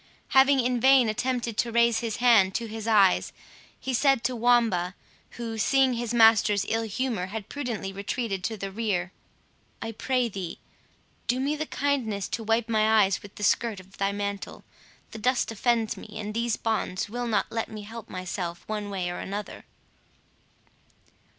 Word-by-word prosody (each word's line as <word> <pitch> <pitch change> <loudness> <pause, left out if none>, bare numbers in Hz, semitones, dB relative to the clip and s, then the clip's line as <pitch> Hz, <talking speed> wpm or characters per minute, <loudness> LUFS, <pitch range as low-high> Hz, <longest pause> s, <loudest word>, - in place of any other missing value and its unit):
Having 270 0 +5
in 245 0 0
vain 265 -1 +6
attempted 240 0 -2
to 235 - +1
raise 235 0 +3
his 230 -3 -3
hand 220 -6 +4
to 235 - -1
his 220 0 -6
eyes, 200 -4 +4 0.5
he 260 - -3
said 270 -1 +3
to 250 +1 0
Wamba, 225 -7 +2 0.4
who, 225 -2 -4
seeing 265 +5 +3
his 235 -1 -3
master's 225 -3 +5
ill 225 0 0
humour 225 -3 -2
had 205 0 -6
prudently 235 -9 -4
retreated 200 0 -3
to 220 +3 -2
the 195 0 -5
rear, 190 -4 -1 0.7
"I 225 - -4
pray 250 +2 0
thee, 190 -5 -6 0.7
do 245 +2 +1
me 280 +3 0
the 310 +1 -4
kindness 235 -9 -1
to 230 - -3
wipe 225 +1 +1
my 220 -1 +4
eyes 195 -1 0
with 205 - -13
the 210 - -7
skirt 220 0 +1
of 190 +1 -17
thy 195 0 +1
mantle; 200 0 -5 0.5
the 220 - -8
dust 250 +1 +1
offends 225 0 +1
me, - - -11
and 210 0 -4
these 235 0 0
bonds 215 -4 -1
will 240 +3 -4
not 215 -3 0
let 225 0 -2
me 215 -1 -8
help 225 +1 -9
myself 180 -1 -5
one 210 -1 -3
way 190 -3 -2
or 175 - -4
another." 205 +2 -6
225 Hz, 170 wpm, -27 LUFS, 200-240 Hz, 0.7 s, vain